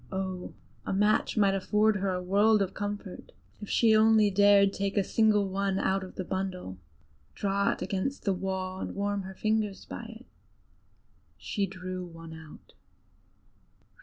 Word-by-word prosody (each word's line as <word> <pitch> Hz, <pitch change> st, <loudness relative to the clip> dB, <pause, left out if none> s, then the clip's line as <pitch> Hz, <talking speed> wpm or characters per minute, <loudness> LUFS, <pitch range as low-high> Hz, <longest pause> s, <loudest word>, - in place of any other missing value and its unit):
Oh! 190 Hz, -1 st, -4 dB, 0.3 s
a -, -, -4 dB
match 210 Hz, +3 st, +2 dB
might 200 Hz, -2 st, +4 dB
afford 210 Hz, +2 st, +2 dB
her 195 Hz, 0 st, -1 dB
a 180 Hz, 0 st, -3 dB
world 205 Hz, +3 st, +4 dB
of 190 Hz, 0 st, -5 dB
comfort, 205 Hz, -1 st, -6 dB, 0.3 s
if 210 Hz, -, -7 dB
she 225 Hz, -2 st, +4 dB
only 215 Hz, -1 st, +5 dB
dared 200 Hz, 0 st, +5 dB
take 200 Hz, +1 st, -2 dB
a 200 Hz, -, +4 dB
single 210 Hz, 0 st, +2 dB
one 195 Hz, 0 st, -1 dB
out 195 Hz, 0 st, 0 dB
of 185 Hz, -, -10 dB
the 185 Hz, -, -3 dB
bundle, 185 Hz, -, -4 dB, 0.6 s
draw 200 Hz, 0 st, +1 dB
it -, -, -6 dB
against 200 Hz, +9 st, -3 dB
the 195 Hz, -, +1 dB
wall, 185 Hz, 0 st, -3 dB
and -, -, -5 dB
warm 200 Hz, 0 st, -1 dB
her 190 Hz, 0 st, -9 dB
fingers 215 Hz, -1 st, -1 dB
by 235 Hz, -, -7 dB, 0.2 s
it. -, -, -18 dB, 1.1 s
She 200 Hz, -3 st, -2 dB
drew 185 Hz, -1 st, -6 dB
one 165 Hz, -2 st, -10 dB
out. 160 Hz, -1 st, -13 dB
195 Hz, 160 wpm, -29 LUFS, 185-205 Hz, 1.1 s, only